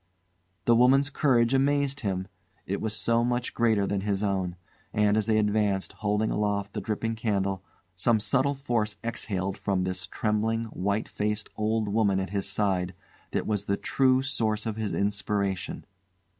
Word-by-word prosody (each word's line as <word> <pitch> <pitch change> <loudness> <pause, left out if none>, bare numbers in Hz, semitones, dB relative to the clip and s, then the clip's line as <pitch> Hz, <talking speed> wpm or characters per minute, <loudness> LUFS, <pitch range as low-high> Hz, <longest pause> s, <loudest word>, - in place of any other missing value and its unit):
The 120 - +5
woman's 135 +4 +5
courage 125 -4 +3
amazed 140 0 +2
him; 95 -4 -2 0.4
it 100 - -2
was 110 0 -2
so 115 0 +2
much 120 0 -1
greater 110 -4 +2
than 100 0 -1
his 100 0 -1
own; 95 -3 -1 0.4
and, 105 0 +3
as 110 -1 +1
they 110 -1 +3
advanced, 105 -2 +1
holding 105 +1 0
aloft 100 -1 -1
the 105 - -3
dripping 110 +3 -2
candle, 100 -4 -1 0.3
some 110 +5 +2
subtle 140 +5 +2
force 115 -6 -1
exhaled 100 -4 -3
from 100 -2 0
this 95 -1 -3
trembling, 110 +1 0
white 100 +3 -1
faced 105 0 -2
old 110 0 0
woman 100 -2 +2
at 95 -1 -3
his 100 -1 -1
side 95 -3 0 0.3
that - - -1
was 105 -2 -1
the 100 - 0
true 130 -1 +2
source 110 -5 -1
of 110 -2 -2
his 110 -2 -2
inspiration. 100 -2 -1
105 Hz, 160 wpm, -27 LUFS, 100-115 Hz, 0.4 s, The